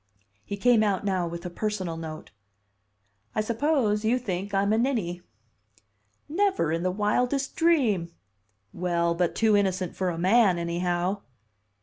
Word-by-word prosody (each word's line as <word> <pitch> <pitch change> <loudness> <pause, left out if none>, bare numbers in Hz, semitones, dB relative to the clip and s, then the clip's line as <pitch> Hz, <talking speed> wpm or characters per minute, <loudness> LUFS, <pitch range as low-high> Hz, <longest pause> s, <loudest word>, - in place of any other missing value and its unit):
He 200 - -5
came 240 +1 +4
out 205 -2 0
now 185 -3 0
with 170 +1 -7
a 180 - -4
personal 190 -3 -3
note. 160 -1 -8 1.0
"I 215 - +2
suppose 225 -2 +1
you 230 +3 +2
think 200 -5 -4
I'm 200 +1 +2
a - - +2
ninny." 215 -9 -1 1.1
"Never 380 - +1
in 165 +1 -1
the 185 - +1
wildest 245 +8 0
dream!" 240 - +2 0.6
"Well, 170 -1 0
but 170 0 0
too 220 -2 +3
innocent 185 -3 0
for 185 -1 -1
a 170 - -4
man, 190 +1 +4
anyhow." 175 +3 -1
195 Hz, 140 wpm, -26 LUFS, 175-225 Hz, 1.1 s, came